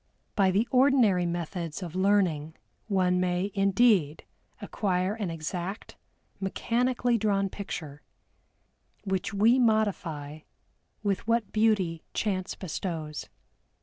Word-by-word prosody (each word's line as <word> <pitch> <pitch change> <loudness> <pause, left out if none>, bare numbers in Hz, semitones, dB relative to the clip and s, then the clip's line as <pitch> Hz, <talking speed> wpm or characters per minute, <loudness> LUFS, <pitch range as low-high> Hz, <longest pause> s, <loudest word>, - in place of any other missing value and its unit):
By 195 -3 +4
the 205 +5 +1
ordinary 250 -9 +4
methods 170 0 -4
of 170 -3 -6
learning 185 -6 +1 0.3
one 185 -3 +2
may 180 +2 0
indeed 195 -6 +3 0.4
acquire 185 -1 -1
an 210 -5 -3
exact, 175 +5 -5 0.4
mechanically 240 +4 0
drawn 200 -2 +1
picture, 155 -8 -7 1.0
which 190 -1 -1
we 220 +6 +4
modify 180 - 0 0.6
with 200 0 -1
what 230 -2 +1
beauty 205 -7 +1
chance 190 -3 -1
bestows. 160 -4 -5
190 Hz, 100 wpm, -28 LUFS, 175-215 Hz, 1.0 s, By